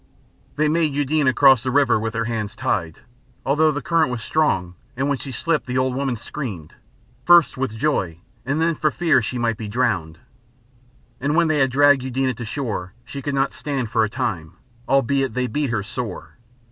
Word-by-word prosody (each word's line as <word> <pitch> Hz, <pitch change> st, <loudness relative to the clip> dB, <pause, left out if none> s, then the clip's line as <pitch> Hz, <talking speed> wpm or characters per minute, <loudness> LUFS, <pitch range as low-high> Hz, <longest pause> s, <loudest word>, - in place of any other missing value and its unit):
They 155 Hz, +1 st, +2 dB
made 155 Hz, -2 st, +1 dB
Eudena 145 Hz, -1 st, +2 dB
cross 135 Hz, -2 st, +5 dB
the 130 Hz, -, -2 dB
river 135 Hz, -4 st, +3 dB
with 110 Hz, +1 st, -3 dB
her 115 Hz, 0 st, -1 dB
hands 110 Hz, -3 st, -3 dB
tied, 85 Hz, -5 st, -2 dB, 0.4 s
although 150 Hz, +4 st, +3 dB
the 145 Hz, -2 st, -3 dB
current 165 Hz, -4 st, +2 dB
was 120 Hz, -2 st, -4 dB
strong 95 Hz, -, 0 dB, 0.2 s
and 135 Hz, +2 st, 0 dB
when 140 Hz, -2 st, 0 dB
she 135 Hz, -, -7 dB
slipped 155 Hz, +4 st, -1 dB
the 125 Hz, +1 st, -2 dB
old 130 Hz, 0 st, +1 dB
woman 135 Hz, -1 st, -1 dB
screamed, 105 Hz, -, -7 dB, 0.5 s
first 175 Hz, -3 st, +5 dB
with 130 Hz, -4 st, -3 dB
joy 100 Hz, -, 0 dB, 0.3 s
and 145 Hz, +5 st, -1 dB
then 165 Hz, +1 st, +2 dB
for 155 Hz, 0 st, +1 dB
fear 165 Hz, +2 st, +2 dB
she 125 Hz, -, -4 dB
might 115 Hz, -2 st, 0 dB
be 110 Hz, -, -6 dB
drowned. 100 Hz, -9 st, -1 dB, 1.0 s
And 145 Hz, +3 st, 0 dB
when 170 Hz, -1 st, +3 dB
they 155 Hz, -1 st, +2 dB
had 135 Hz, -1 st, +3 dB
dragged 145 Hz, +1 st, +4 dB
Eudena 130 Hz, 0 st, -1 dB
to 120 Hz, -, -5 dB
shore, 105 Hz, -7 st, -4 dB
she 130 Hz, +3 st, -7 dB
could 145 Hz, 0 st, -3 dB
not 135 Hz, 0 st, +1 dB
stand 130 Hz, -2 st, -3 dB
for 110 Hz, -, +3 dB
a 110 Hz, -, 0 dB
time, 85 Hz, -6 st, -3 dB, 0.4 s
albeit 135 Hz, -2 st, +1 dB
they 125 Hz, 0 st, 0 dB
beat 145 Hz, +2 st, -2 dB
her 110 Hz, -4 st, -1 dB
sore. 105 Hz, -1 st, -6 dB
130 Hz, 195 wpm, -22 LUFS, 115-145 Hz, 1.0 s, cross